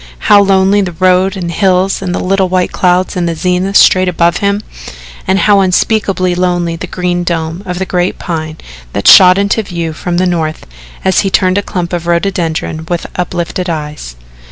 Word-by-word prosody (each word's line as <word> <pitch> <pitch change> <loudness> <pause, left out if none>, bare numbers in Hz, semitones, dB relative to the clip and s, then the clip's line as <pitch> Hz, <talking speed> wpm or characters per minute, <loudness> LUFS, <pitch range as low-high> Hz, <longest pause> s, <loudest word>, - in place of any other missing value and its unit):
How 205 - +7
lonely 195 +1 +2
the 180 -3 -3
road 185 +2 +1
and 175 -2 -4
hills 190 +1 +1
and 185 -2 -3
the - - -2
little 190 0 0
white 180 0 0
clouds 180 +2 0
in 175 -1 -1
the 165 - -2
zenith 180 +3 0
straight 185 0 +4
above 170 0 +1
him 200 +1 -1 0.6
and 190 - +2
how 200 0 +3
unspeakably 190 -1 +1
lonely 175 -1 -1
the 180 +2 -7
green 175 0 -2
dome 165 0 -3
of 180 0 -4
the 190 - -2
great 180 0 -1
Pine 155 -2 -5 0.4
that 100 - -2
shot 185 -1 +8
into 200 +2 +1
view 170 -5 -5
from 175 +2 -3
the 185 - +1
north 160 -3 -2 0.4
as 190 - +2
he 195 - 0
turned 185 0 +2
a - - -1
clump 180 -3 -5
of 170 -1 -3
rhododendron 170 -3 -2
with 175 -1 -2
uplifted 180 0 -3
eyes. 150 - -6
180 Hz, 185 wpm, -12 LUFS, 170-190 Hz, 0.6 s, shot